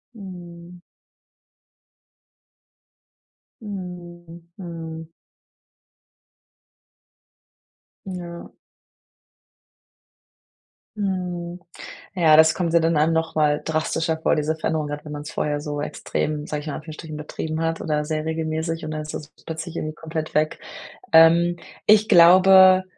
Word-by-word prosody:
Mhm. 175 -3 -11 2.8
Mhm, 175 -4 -9
mhm. 165 -3 -7 3.0
Ja. 175 -2 -8 2.4
Mhm, 180 -3 -3 0.6
ja, 165 -5 +5
das 160 0 +6
kommt 170 -3 -1
ja 170 - +5
dann 165 0 +1
einem 155 +2 +3
noch 160 0 -1
mal 150 -1 +2
drastischer 160 0 -1
vor, - - +2
diese 155 +1 -1
Veränderung, 155 -1 -2
gerade 145 0 -6
wenn 150 - -8
man's 145 +1 -7
vorher 145 -1 -2
so 145 0 -4
extrem 150 0 -3
sage 150 - -3
ich - - -12
mal 150 - -3
in - - -4
Anführungsstrichen, 155 0 -8
betrieben 155 +1 -5
hat, 165 0 -2
oder 150 -2 -1
sehr 155 -1 -2
regelmäßig 160 0 -3
und 155 - -5
dann 155 0 -4
ist 155 - -7
das 150 - -7 0.2
plötzlich 160 +1 -6
irgendwie 155 -1 -4
komplett 160 0 -6
weg. 155 +1 0 0.5
Ähm, 170 +2 +6 0.3
ich 215 +1 +5
glaube, 185 +1 +7
165 Hz, 115 wpm, -23 LUFS, 155-175 Hz, 3.0 s, glaube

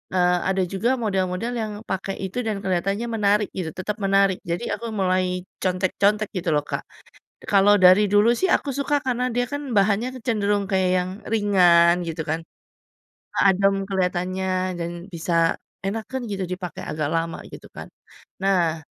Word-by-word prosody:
eee, 180 0 +3
ada 190 0 +1
juga 225 +6 0
model-model 190 +1 -1
yang 215 -1 -3
pakai 190 +1 -3
itu 190 +6 -3
dan 205 -2 -1
kelihatannya 195 +5 -1
menarik 210 -1 +2
gitu, 175 -4 -2
tetap 210 +4 -4
menarik. 195 -1 +3
Jadi 170 +1 -2
aku 230 +2 -5
mulai 185 -1 0 0.2
contek-contek 195 +3 +1
gitu 175 - -2
loh, 145 - +1
Kak. - - -4 0.7
Kalau 205 0 +5
dari 185 +3 +7
dulu 210 +3 +5
sih 380 - +1
aku 285 - +1
suka 285 +1 0
karena 250 0 0
dia 245 - +1
kan 285 -3 -5
bahannya 205 +4 +2 0.2
cenderung 205 -3 +1
kayak 190 -2 +2
yang 180 0 -2 0.2
ringan 180 -5 +4
gitu 165 0 -4
kan, 160 +2 -1 1.0
adem 195 0 +3
kelihatannya 185 0 -1
dan 170 0 -3 0.2
bisa 165 0 +1 0.3
enakeun 225 +5 -3
gitu 195 -1 -2
dipakai 180 -2 -5
agak 150 -1 -2
lama 165 0 -1
gitu - - -10
kan. - - -9 0.5
Nah 175 -5 +2
195 Hz, 150 wpm, -23 LUFS, 180-210 Hz, 1.0 s, dari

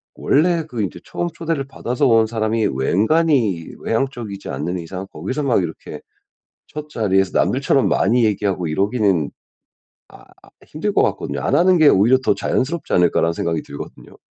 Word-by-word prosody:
원래 165 +3 +2
그 125 -7 -5
이제 95 - -5
처음 175 - -3
초대를 165 -4 -3
받아서 125 -2 -1
온 115 -2 +4
사람이 110 0 -1
웬간히 105 - +1
외향적이지 115 -5 -3
않는 90 +1 -3
이상 90 +3 -7
거기서 130 - -4
막 125 -7 +2
이렇게 85 -2 -7 0.7
첫 150 0 -8
자리에서 95 -7 +1
남들처럼 - - +2
많이 115 +4 +2
얘기하고 100 -4 -1
이러기는 95 -2 +1 0.8
아 - - -16 0.4
힘들 185 +7 -3
것 - - +3
같거든요. - - -2
'안 - - 0
하는 180 +1 +4
게 155 -2 +5
오히려 115 +3 +5
더 - - +3
자연스럽지 145 +4 -2
않을까.'라는 85 -1 +3
생각이 80 -1 -2
들거든요. 70 - -11
110 Hz, 370 characters per minute, -20 LUFS, 95-140 Hz, 0.8 s, 게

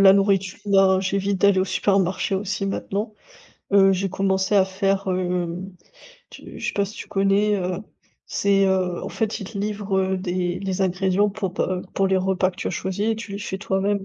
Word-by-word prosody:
la 195 -1 +8
nourriture, 195 -2 +2
ben 195 -1 +5
j'évite 195 0 -1
d'aller 200 -2 +5
au - - +2
supermarché 195 0 +1
aussi 195 0 -2
maintenant, 205 +2 -3 0.6
heu, 195 -1 +6
j'ai 195 +1 -1
commencé 190 +1 0
à 190 - +5
faire, 195 +1 0
hem, 180 0 -2 0.6
tu - - -11
je - - -4
sais - - -1
pas 200 - +1
si 205 +2 -9
tu - - -7
connais, 200 +2 +2
heu, 180 -1 -2 0.5
c'est, 195 -1 +2
heu, 185 -2 0
en - - -4
fait 220 -2 -2
ils 200 - -6
te 220 - -9
livrent, 205 -1 -2
heu, 190 0 +1
des 180 -1 -2
les 195 -1 -2
ingrédients 190 +2 +1
pour 195 -3 -4
pas, - - 0
heu, - - -6
pour 195 0 +2
les 190 - +2
repas 185 0 +1
que 180 - -21
tu - - -5
as - - 0
choisis 190 +4 -2
et - - +1
tu 225 -2 -8
les 200 - -4
fais 190 -2 -4
toi-même. 195 0 0
195 Hz, 210 wpm, -23 LUFS, 185-200 Hz, 0.6 s, la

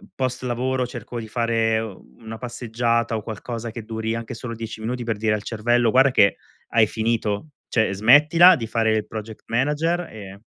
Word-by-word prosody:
post 130 -1 -2
lavoro, 125 +1 -1
cerco 120 -1 -7
di 110 - -7
fare 115 -1 +1
una 110 - -9
passeggiata, 115 -1 -1
o 110 - -4
qualcosa 115 +2 -6
che 115 0 -7
duri 110 +1 -3
anche 115 -1 -5
solo 115 0 -6
10 115 0 -7
minuti 120 +2 -3
per 115 -2 -2
dire 105 0 +1
al 105 -1 -2
cervello: 120 +1 +1
"Guarda 135 +2 +5
che 100 -5 +4 0.3
hai 110 -2 +4
finito, 110 +2 -1 0.2
cioè, 110 -4 +1
smettila 150 - +7
di 115 -6 -4
fare 110 0 +1
il 110 - -1
project 110 0 -8
manager, 150 +8 0
e" 100 -2 -10
115 Hz, 175 wpm, -23 LUFS, 110-125 Hz, 0.3 s, smettila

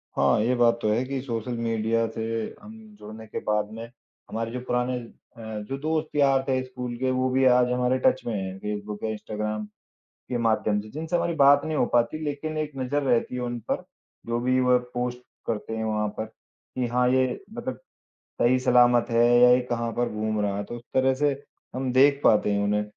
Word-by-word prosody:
हाँ, 70 +5 +3
ये 120 +3 +2
बात 120 -1 +4
तो 110 - +1
है 120 +4 +1
कि 135 0 -3
सोशल 120 -1 -4
मीडिया 115 0 0
से 110 - -5 0.4
हम 210 +2 -11 0.3
जुड़ने 110 +1 -10
के - - -5
बाद 105 0 +1
में, 115 +1 -7 0.4
हमारे 115 +1 -3
जो 125 - -4
पुराने 125 +1 0 0.4
अ, - - -10 0.3
जो 135 - -2
दोस्त-यार 145 -3 +1
थे 130 -1 +1
स्कूल 125 -1 -6
के, 130 +1 0
वो 130 0 +1
भी 130 +1 +2
आज 125 -1 +4
हमारे 125 +1 +1
टच - - +4
में 115 - -2
हैं, 95 -1 -4
फ़ेसबुक 105 +1 -5
या 110 - -1
इंस्टाग्राम 105 0 -4 0.6
के 125 - -1
माध्यम 110 -2 +1
से, 105 - -11
जिनसे 160 +3 -2
हमारी 170 0 0
बात 140 -1 +5
नहीं 155 -1 -2
हो 120 - +2
पाती 120 +6 +2
लेकिन 150 +2 -3
एक 150 -1 -3
नज़र 135 +3 -1
रहती 125 -2 +1
है 125 - -3
उन 120 -1 -3
पर। - - -1 0.4
जो 120 0 -1
भी 130 +1 +2
वह 125 -1 +4 0.2
पोस्ट 125 0 -2 0.3
करते 110 0 -3
हैं, 110 - -2
वहाँ 105 -1 0
पर - - -1
कि 120 +2 -8
हाँ, 125 +1 +2
ये 130 -1 +1
मतलब 240 +2 -5 0.6
सही 125 +2 +4
सलामत 120 -1 +4
है 115 0 +4
या 125 0 +8
ये 125 - +5
कहाँ 115 -1 -1
पर 120 +1 0
घूम 110 0 -1
रहा 100 -1 0
है। 100 - -3
तो 120 - -7
उस 120 - -11
तरह 130 0 +3
से 145 +2 +1 0.4
हम 130 0 -2
देख 140 +2 +5
पाते 105 -1 +4
हैं 100 0 +1
उन्हें। 105 +1 +1
125 Hz, 210 wpm, -25 LUFS, 110-130 Hz, 0.6 s, या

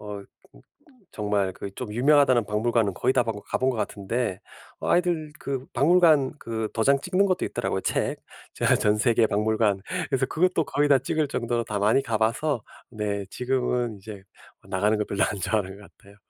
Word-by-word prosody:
어 105 -1 -7 0.9
정말 105 -3 -1
그 100 - -7
좀 120 +1 -6
유명하다는 130 -1 +4
박물관은 110 0 0
거의 130 - +1
다 125 - +4
방 115 -2 -2
가 - - -3
본 130 +1 +2
것 125 - -4
같은데 105 -1 -3 0.4
어 - - -3
아이들 170 -4 +1
그 135 -2 -4
박물관 155 -1 +4
그 110 -3 -4
도장 135 +5 +3
찍는 185 +5 +1
것도 185 -2 0
있더라고요, - - -2
책. - - -1 0.3
저 - - -2
전 105 0 +1
세계 115 -1 +3
박물관. 105 -1 +1 0.3
그래서 135 -1 +1
그것도 175 +1 +1
거의 145 +1 0
다 140 - +7
찍을 155 +3 -1
정도로 120 -2 -1
다 105 -2 -3
많이 105 +7 +3
가 115 -5 -1
봐서 115 +4 0 0.3
네 105 -3 -3
지금은 125 -2 -1
이제 100 -1 -10 0.5
나가는 105 +3 +1
걸 105 - -1
별로 100 - +1
안 105 - -3
좋아하는 100 0 -1
것 100 - -14
같아요. 100 +1 -19
115 Hz, 340 characters per minute, -25 LUFS, 105-135 Hz, 0.9 s, 다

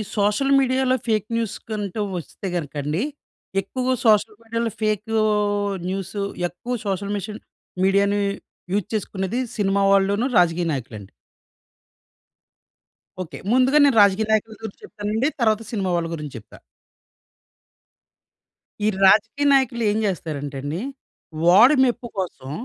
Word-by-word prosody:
Social 210 +7 +1
మీడియాలో 260 -1 +2
fake 215 -2 +1
న్యూస్‌కంటూ 215 -2 -3 0.2
వస్తే 175 +3 -7
గనుక 155 -5 -4
అండి 150 +6 -1 0.6
ఎక్కువగా 255 +6 -2
సోషల్ 215 0 +4
మీడియాలో 230 0 -2
ఫేక్ 215 -1 0 0.8
న్యూస్ 190 0 -4 0.3
ఎక్కువ 180 +8 -6
సోషల్ 200 +1 -2
మిషాని 210 +2 -6 0.4
మీడియాని 200 +1 +2 0.5
యూజ్ 205 -1 0
చేసుకునేది 200 +3 -2 0.2
సినిమా 200 -1 +1
వాళ్ళను 200 +5 +2
రాజకీయ 175 -1 +3
నాయకులండి. 115 -7 -7 2.1
ఓకే. 175 - -7 0.2
ముందుగా 260 +3 +4
నేను 270 -5 +3
రాజకీయ 200 +2 +4
నాయకుల 220 +1 +1
గురించి 220 -3 -8
చెప్తానండి. 215 +6 -2
తర్వాత 220 -1 +3
సినిమా 200 -5 -1
వాళ్ళ 170 -1 -1
గురించి 150 -4 -7
చెప్తా. 110 - -17 2.3
ఈ - - +3 0.2
రాజకీయ 225 +8 +4
నాయకులు 255 -3 +2
ఏం 210 - -1
జేస్తారంటే 150 -7 -3
అండి. 145 +5 -4 0.7
వాడి 225 +11 +7
మెప్పు 245 -1 0
కోసం 155 -7 -5
205 Hz, 115 wpm, -22 LUFS, 185-225 Hz, 2.3 s, వాడి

